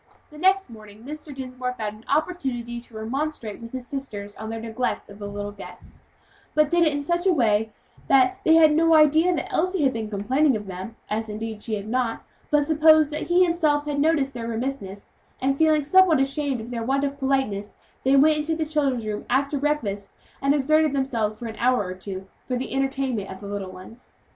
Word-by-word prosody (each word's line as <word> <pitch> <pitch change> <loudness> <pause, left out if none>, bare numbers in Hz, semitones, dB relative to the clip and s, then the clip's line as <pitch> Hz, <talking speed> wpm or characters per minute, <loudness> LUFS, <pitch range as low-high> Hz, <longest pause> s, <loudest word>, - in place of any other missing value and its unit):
The 300 - -12
next 380 -4 +2
morning 215 -1 -13
Mr. 300 +2 -8
Dinsmore 255 -2 -5
found 215 -1 -4
an 220 - -20
opportunity 265 -7 -1
to 235 -1 -17
remonstrate 240 -1 -4
with 230 0 -9
his 255 -1 -6
sisters 215 -7 -6
on 220 0 -7
their 225 0 -4
neglect 230 +1 -3
of 200 - -13
the 205 - -5
little 205 0 -5
guests, 205 - -13 0.5
but 305 -1 +3
did 345 -1 +4
it - - +3
in 285 0 -2
such 345 +4 0
a - - +5
way 220 -8 +2 0.4
that 275 +8 +4
they 320 -4 +5
had 315 -2 +6
no 330 0 +4
idea 310 +3 +5
that 295 - -4
Elsie 365 -1 +1
had 265 - +3
been 220 -2 -4
complaining 255 +8 +2
of 210 -1 -4
them 190 +3 -7
as, 220 +1 -3
indeed, 215 0 -5
she 220 -1 -3
had 205 0 -6
not 240 0 -1 0.3
but 295 -1 +3
supposed 310 0 +5
that 300 0 -4
he 350 +2 +4
had 360 - +5
himself 300 -4 +1
noticed 290 -1 +1
their 230 -2 -5
remissness; 225 -4 -5 0.3
and 270 +1 +1
feeling 310 0 +3
somewhat 350 0 +5
ashamed 275 -1 0
of 225 +2 -8
their 235 -1 -3
want 270 +4 0
of 280 0 -2
politeness, 265 -7 -1 0.3
they 265 +1 +4
went 305 +3 +5
into 305 +2 -1
the 315 -1 -1
children's 280 -6 0
room 210 -1 -3
after 280 +3 +1
breakfast, 220 -10 -1 0.3
and 275 +1 +3
exerted 310 +1 +3
themselves 230 -6 -1
for 235 - -8
an 225 -1 -5
hour 245 -3 +2
or 185 - -4
two, 190 0 -7 0.2
for 255 - -1
the 260 - -4
entertainment 270 -6 -1
of 190 - -8
the - - -10
little 200 -2 -5
ones. 185 +6 -13
265 Hz, 210 wpm, -24 LUFS, 220-300 Hz, 0.5 s, had